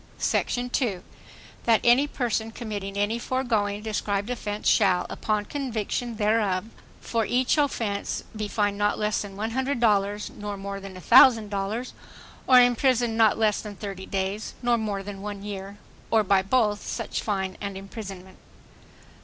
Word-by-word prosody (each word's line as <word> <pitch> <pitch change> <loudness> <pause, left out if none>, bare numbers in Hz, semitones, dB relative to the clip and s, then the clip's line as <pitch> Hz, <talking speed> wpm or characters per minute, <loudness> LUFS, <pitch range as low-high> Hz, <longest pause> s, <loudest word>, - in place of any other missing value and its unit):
Sec. - - +1
2. 245 -6 -1 0.6
That 230 -2 +5
any 250 +4 +5
person 230 -5 -1
committing 205 -4 -5
any 210 +3 0
foregoing 220 -6 -1
described 205 0 -2
offense 210 -4 -3
shall, 190 -4 +4
upon 210 -2 -1
conviction 240 -2 -3
thereof, 210 -3 +1 0.3
for 230 -1 -1
each 250 +3 +2
offense 225 -8 -1
be 215 -1 -3
fined 205 -1 0
not 205 0 +2
less 210 0 0
than 200 -2 -7
$100 220 -3 0
nor 205 -1 -6
more 200 0 -5
than 195 -1 -9
$1,000 220 +1 +4 0.6
or 255 -1 +8
imprisoned 245 -1 +3
not 225 -2 +4
less 215 -2 +2
than 210 -2 -8
thirty 195 -2 -7
days 195 +2 -3
nor 240 0 +3
more 210 -3 -2
than 200 -1 -7
one 205 -1 -6
year, 200 -1 -6 0.3
or 220 -1 +4
by 195 -1 +3
both 210 0 +1
such - - -3
fine 190 -3 -2
and 200 -1 -4
imprisonment. 195 -2 -9
210 Hz, 145 wpm, -26 LUFS, 200-235 Hz, 0.6 s, or